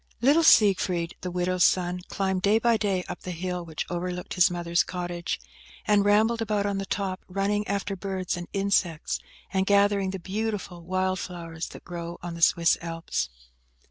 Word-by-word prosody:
LITTLE 280 +7 +5
Siegfried, 190 - +4
the 180 - -3
widow's 180 0 +1
son, 180 0 +2
climbed 190 -1 -1
day 205 +3 +4
by 235 +1 +3
day 195 -4 0
up 180 - -6
the - - -7
hill 180 0 -3
which 160 -2 -5
overlooked 180 0 -4
his 180 -1 +5
mother's 170 -1 +1
cottage, 175 -1 -4 0.5
and 210 -2 +4
rambled 220 +3 +3
about 210 -2 0
on 200 -1 -1
the 195 - -4
top, 190 -2 -2
running 200 +2 0
after 200 0 -2
birds 190 -1 -3
and 175 -1 -6
insects, 195 -5 0 0.3
and 190 0 +1
gathering 200 -1 +3
the 195 - -3
beautiful 195 -1 -4
wild 185 +1 -1
flowers 165 -2 -6
that - - -11
grow 170 0 -6
on 175 -1 -4
the 170 - -8
Swiss 170 0 +4
Alps. 165 - -3
185 Hz, 175 wpm, -26 LUFS, 175-200 Hz, 0.5 s, LITTLE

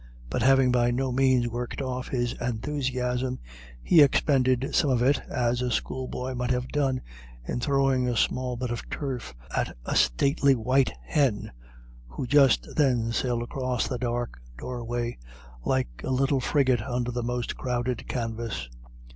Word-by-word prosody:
But - - -1
having 135 0 +5
by 120 -1 +3
no 130 +2 0
means 130 -1 +3
worked 120 +1 -4
off 130 -2 -3
his 120 -2 -1
enthusiasm, 125 +1 -2 0.5
he 165 - +6
expended 130 -2 +3
some 155 -5 +3
of 125 -2 +2
it, 140 +3 +3
as 120 0 0
a 125 - 0
schoolboy 130 +1 -3
might 125 0 -2
have 125 0 -1
done, 135 -3 0 0.5
in - - -2
throwing 135 -1 +2
a 120 - -1
small 125 +1 0
bit 125 -1 -3
of 120 - -5
turf 125 - -4 0.2
at - - -1
a - - -2
stately 140 - +3
white 130 +3 +2
hen, 125 - 0 0.6
who 65 - -5
just 135 0 +4
then 125 -6 +2
sailed 120 0 0
across 130 0 -2
the 125 -3 -3
dark 120 - -2 0.2
doorway, 120 - -4 0.5
like - - -1
a - - -3
little 135 +1 +2
frigate 130 -3 +2
under 125 +1 -2
the 120 0 -2
most 120 0 -2
crowded 125 -1 -2
canvas. 115 - -3
125 Hz, 155 wpm, -27 LUFS, 120-130 Hz, 0.6 s, he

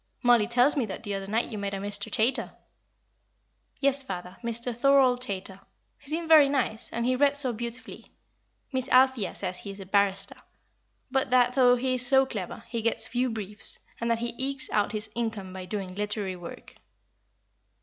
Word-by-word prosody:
Mollie 240 -3 +5
tells 245 +4 +3
me 260 -6 0
that 190 - -7
the 205 -2 -3
other 195 0 -4
night 225 +4 -1
you 215 - -4
met 200 0 -3
a - - -3
Mr. 205 +2 0
Chaytor." 225 +6 0 1.2
"Yes, 275 0 +2
father, 180 -6 -7
Mr. 235 +1 -2
Thorold 260 -1 +4
Chaytor. 190 -3 -4 0.4
He 280 - -9
seemed 325 +2 -2
very 310 -3 +7
nice, 255 -5 -1
and 235 +1 -2
he 255 +1 +2
read 285 +2 +3
so 260 -4 0
beautifully. 235 +2 -6 0.7
Miss 260 -1 -1
Althea 260 -4 +3
says 180 -2 -3
he 200 - -8
is 195 0 -8
a 195 - -8
barrister 195 0 +1 0.7
but 265 0 +1
that, 250 0 +4
though 250 -1 +5
he 255 +1 -1
is 250 -1 +5
so 270 0 +5
clever, 220 -2 -6
he 230 -2 -3
gets 230 +1 -1
few 250 +2 0
briefs, 210 -2 -5 0.2
and 235 - -2
that 230 - +2
he 235 +1 -3
ekes 270 0 -2
out 210 -1 +1
his 215 0 -2
income 220 -5 -4
by 185 -1 -7
doing 190 -1 -5
literary 205 -1 -3
work." 175 -1 -10
235 Hz, 185 wpm, -27 LUFS, 200-255 Hz, 1.2 s, very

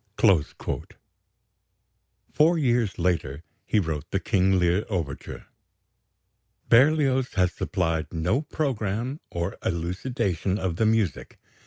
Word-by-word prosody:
Four 165 +3 +4
years 120 - +1
later 85 -4 -1 0.2
he - - +1
wrote 80 -6 -3
the - - 0
"King 95 0 +2
Lear" 90 +3 +2
overture. 80 -9 -4 1.2
Berlioz 135 0 +4
has 90 -2 +2
supplied 80 -4 -2
no 90 - 0
programme 130 -3 -2
or 85 0 -4
elucidation 95 +2 -1
of 90 -5 -2
the 110 - +2
music. 110 -8 0
95 Hz, 100 wpm, -25 LUFS, 85-125 Hz, 1.2 s, Four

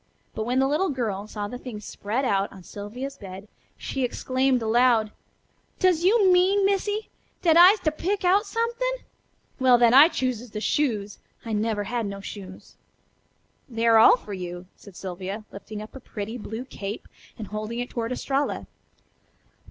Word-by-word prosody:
But 220 - -3
when 250 +1 0
the 265 0 +3
little 305 +7 +1
girl 215 -7 -3
saw 210 -1 -5
the 245 +4 -7
things 215 -6 -8
spread 230 +7 -3
out 195 -3 +1
on 190 -2 -13
Sylvia's 245 +9 -7
bed 195 +1 -10 0.3
she 270 - -3
exclaimed 255 0 0
aloud: 225 -1 +3 0.7
"Does 360 -3 +2
you 390 -1 +5
mean, 385 +2 +4
Missy, 410 +2 0 0.3
dat 330 -3 +5
I'se 365 +5 +8
to 310 - +1
pick 375 +5 -2
out 400 +4 +3
somethin'? 475 +3 -2 0.5
Well, 255 -2 +6
then 235 -1 +5
I 280 +4 +9
chooses 250 -6 -3
the 210 - -5
shoes. 215 -5 -1 0.3
I 225 - -3
never 210 0 0
had 230 +1 -2
no 200 0 -6
shoes." 190 -1 -10 0.9
"They 230 -1 -2
are 225 -1 +6
all 225 - +8
for 210 -4 -9
you," 180 -1 -6
said 200 -3 -15
Sylvia, 190 +3 -6
lifting 210 +1 -8
up 215 - -13
a - - -7
pretty 220 -2 -6
blue 225 +3 -6
cape 210 -4 -7 0.3
and 215 -3 -7
holding 215 +2 -4
it 245 +1 -4
toward 230 0 -3
Estralla. 275 +2 -1
240 Hz, 170 wpm, -25 LUFS, 210-295 Hz, 0.9 s, I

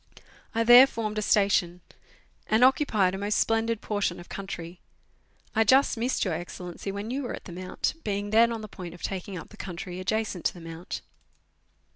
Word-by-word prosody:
I 230 - +3
there 245 +3 +9
formed 215 -4 -3
a - - -1
station, 195 -4 +2 0.7
and 220 +3 +3
occupied 225 -8 +3
a 195 - -4
most 205 +1 0
splendid 225 0 +1
portion 205 -5 -1
of 175 - -12
country. 175 -3 -7 0.8
I 225 - +5
just 265 +6 +4
missed 240 +1 0
Your 185 - 0
Excellency 175 +3 -6
when 200 +3 -5
you 270 +3 -2
were 250 - -4
at - - -13
the 185 - -9
Mount, 185 +1 -3
being 205 0 -2
then 230 +2 +5
on 225 -1 -4
the 215 - -7
point 180 -4 -9
of 175 - -15
taking 190 0 -4
up 165 - -9
the 215 - -15
country 180 -1 -6
adjacent 200 -1 -2
to - - +1
the - - -10
Mount. 165 +2 -7
205 Hz, 190 wpm, -27 LUFS, 180-225 Hz, 0.8 s, there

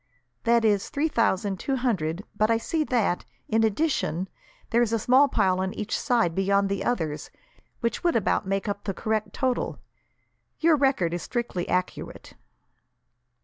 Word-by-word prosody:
"That 235 -1 +4
is 205 -2 +2
three 305 +3 0
thousand 200 -6 +1
two 270 - -1
hundred, 195 -9 -1
but 215 +1 +2
I 230 - +4
see 310 +7 -1
that, 225 -9 +1 0.2
in 225 0 +2
addition, 215 - 0 0.4
there 235 - +4
is 235 -2 +1
a 230 - +2
small 255 +6 +5
pile 185 -8 +1
on 190 0 -2
each 215 +1 -2
side, 230 -9 +1
beyond 195 +2 +2
the 200 -1 -2
others, 160 -11 -2 0.5
which 235 -1 -1
would 345 -1 +2
about 205 -3 +1
make 195 +2 -1
up 205 0 -3
the 195 -3 -2
correct 220 0 -1
total. 260 -2 -1 0.8
Your 325 0 +5
record 265 - +1
is 175 - -2
strictly 235 -8 -3
accurate." 180 0 -3
215 Hz, 160 wpm, -26 LUFS, 190-245 Hz, 0.8 s, small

